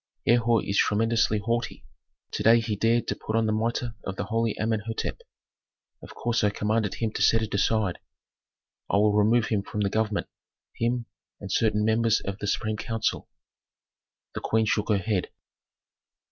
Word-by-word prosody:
"Herhor 120 Hz, -1 st, +3 dB
is 100 Hz, -, 0 dB
tremendously 115 Hz, 0 st, +2 dB
haughty. 115 Hz, +3 st, -2 dB, 0.5 s
To -, -, -3 dB
day 115 Hz, +1 st, +6 dB
he 110 Hz, -2 st, -2 dB
dared 115 Hz, +3 st, +1 dB
to -, -, -1 dB
put 110 Hz, -, -4 dB
on 115 Hz, 0 st, +2 dB
the 110 Hz, -, +1 dB
mitre 115 Hz, +2 st, -1 dB
of 95 Hz, -, -4 dB
the -, -, -3 dB
holy 115 Hz, +1 st, -1 dB
Amenhôtep. 110 Hz, 0 st, -2 dB, 0.8 s
Of -, -, -12 dB
course 120 Hz, -2 st, 0 dB
I 105 Hz, -, +4 dB
commanded 105 Hz, 0 st, -1 dB
him 115 Hz, -2 st, -2 dB
to -, -, -4 dB
set 115 Hz, 0 st, +4 dB
it 110 Hz, -, -5 dB
aside. 100 Hz, -2 st, +1 dB, 0.9 s
I -, -, +2 dB
will 105 Hz, 0 st, +4 dB
remove 110 Hz, +2 st, +3 dB
him 105 Hz, -3 st, +1 dB
from 105 Hz, +1 st, -4 dB
the 100 Hz, -1 st, 0 dB
government, 110 Hz, -2 st, 0 dB, 0.5 s
him 120 Hz, +1 st, -1 dB, 0.3 s
and 100 Hz, -2 st, -7 dB
certain 105 Hz, +1 st, +2 dB
members 110 Hz, 0 st, +3 dB
of 100 Hz, +1 st, -6 dB
the 105 Hz, -, -4 dB
supreme 110 Hz, +1 st, -1 dB
council." 110 Hz, 0 st, -2 dB, 1.0 s
The -, -, -5 dB
queen 110 Hz, 0 st, +1 dB
shook 105 Hz, 0 st, 0 dB
her 105 Hz, -, +4 dB
head. 95 Hz, -1 st, -1 dB
110 Hz, 170 wpm, -26 LUFS, 105-115 Hz, 1.0 s, day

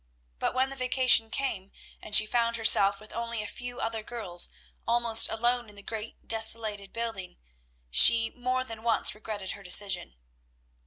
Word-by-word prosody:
But -, -, -2 dB
when 260 Hz, +1 st, 0 dB
the -, -, -7 dB
vacation 255 Hz, -3 st, +3 dB
came, 200 Hz, -7 st, -4 dB, 0.3 s
and 210 Hz, -, -1 dB
she 215 Hz, -, +8 dB
found 235 Hz, +1 st, 0 dB
herself 200 Hz, -3 st, +4 dB
with 215 Hz, +1 st, -12 dB
only 235 Hz, -1 st, -3 dB
a -, -, -7 dB
few 245 Hz, +2 st, -8 dB
other 225 Hz, -1 st, -4 dB
girls 210 Hz, -6 st, -2 dB, 0.4 s
almost 230 Hz, -1 st, +3 dB
alone 240 Hz, +1 st, -1 dB
in 205 Hz, -, -15 dB
the 200 Hz, -, -9 dB
great 220 Hz, +1 st, -9 dB
desolated 220 Hz, -3 st, 0 dB
building, 225 Hz, -6 st, -6 dB, 0.5 s
she 225 Hz, -, +6 dB
more 255 Hz, +1 st, -3 dB
than 225 Hz, -3 st, -10 dB
once 230 Hz, 0 st, +2 dB
regretted 210 Hz, -3 st, -7 dB
her 200 Hz, -, -9 dB
decision. 180 Hz, -, 0 dB
225 Hz, 160 wpm, -27 LUFS, 205-235 Hz, 0.5 s, she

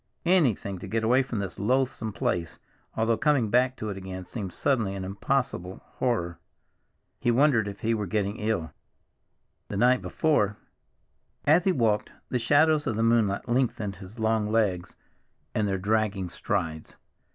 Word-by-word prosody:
Anything 130 Hz, -, +2 dB
to -, -, -8 dB
get 115 Hz, 0 st, -1 dB
away 125 Hz, +4 st, +4 dB
from 125 Hz, -3 st, -4 dB
this 100 Hz, -3 st, -4 dB
loathsome 120 Hz, 0 st, 0 dB
place, 85 Hz, -4 st, -2 dB, 0.4 s
although 110 Hz, 0 st, +2 dB
coming 140 Hz, -8 st, +2 dB
back 125 Hz, +2 st, +3 dB
to 110 Hz, -1 st, -4 dB
it 95 Hz, -, -6 dB
again 95 Hz, -1 st, -7 dB
seemed 100 Hz, -3 st, -5 dB
suddenly 110 Hz, -4 st, 0 dB
an 95 Hz, -, -5 dB
impossible 100 Hz, -2 st, -2 dB, 0.2 s
horror. 85 Hz, -10 st, -1 dB, 0.8 s
He -, -, 0 dB
wondered 120 Hz, -3 st, +3 dB
if 100 Hz, 0 st, -7 dB
he 115 Hz, +1 st, +1 dB
were 105 Hz, -3 st, -2 dB
getting 100 Hz, +2 st, -1 dB
ill. 105 Hz, -7 st, -2 dB, 0.9 s
The 100 Hz, -, -4 dB
night 125 Hz, +3 st, +4 dB
before— 125 Hz, -11 st, +1 dB, 0.9 s
As 160 Hz, +5 st, +4 dB
he 190 Hz, -, +4 dB
walked, 115 Hz, -, +1 dB, 0.2 s
the 125 Hz, -, 0 dB
shadows 150 Hz, +5 st, +3 dB
of 115 Hz, -, 0 dB
the 115 Hz, -, 0 dB
moonlight 115 Hz, -3 st, +2 dB
lengthened 120 Hz, -5 st, 0 dB
his 95 Hz, +4 st, -12 dB
long 110 Hz, -1 st, +1 dB
legs, 100 Hz, -6 st, 0 dB, 0.6 s
and 105 Hz, -1 st, +1 dB
their 95 Hz, -1 st, 0 dB
dragging 100 Hz, -1 st, 0 dB
strides. 80 Hz, -2 st, -3 dB
110 Hz, 155 wpm, -27 LUFS, 100-125 Hz, 0.9 s, away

